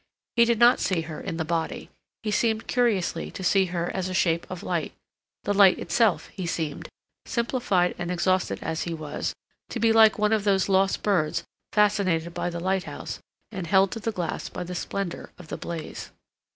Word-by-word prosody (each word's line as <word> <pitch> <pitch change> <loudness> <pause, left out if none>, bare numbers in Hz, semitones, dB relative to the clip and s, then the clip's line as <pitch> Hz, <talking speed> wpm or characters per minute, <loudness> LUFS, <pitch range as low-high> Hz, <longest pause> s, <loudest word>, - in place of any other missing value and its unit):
He 235 -1 +6
did 235 -1 +2
not 240 +2 +6
see 180 -4 +1
her 160 -1 -7
in 165 -4 -4
the 160 - -1
body; 165 0 -3 0.3
he 215 - -1
seemed 220 +1 +1
curiously 210 -9 0
to 190 - -8
see 190 +2 +4
her 175 -1 -2
as 185 -1 -2
a 185 - -3
shape 170 -1 +1
of 185 -2 -6
light, - - -2 0.5
the 205 - 0
light 195 -2 +6
itself; 225 -6 +1
he 185 -3 -5
seemed, 160 -3 -3 0.4
simplified 235 -7 +1
and 175 0 -3
exhausted 185 +1 +1
as 160 0 -2
he 170 -1 -3
was, 155 -2 -4 0.3
to 240 - -4
be 225 0 +4
like 220 -1 +6
one 210 +1 +2
of 215 -2 +1
those 195 -2 +2
lost 195 0 +2
birds 180 -7 +1 0.3
fascinated 190 -6 +2
by 175 - -2
the 170 -1 -5
lighthouse 190 +1 -3 0.3
and 185 -5 -5
held 190 +1 +4
to 225 - -4
the 225 +1 -2
glass 175 -5 -3
by - - -5
the 180 +1 -6
splendor 180 0 -4
of 180 -3 -13
the - - -4
blaze. 165 -2 -6
185 Hz, 190 wpm, -26 LUFS, 170-210 Hz, 0.5 s, He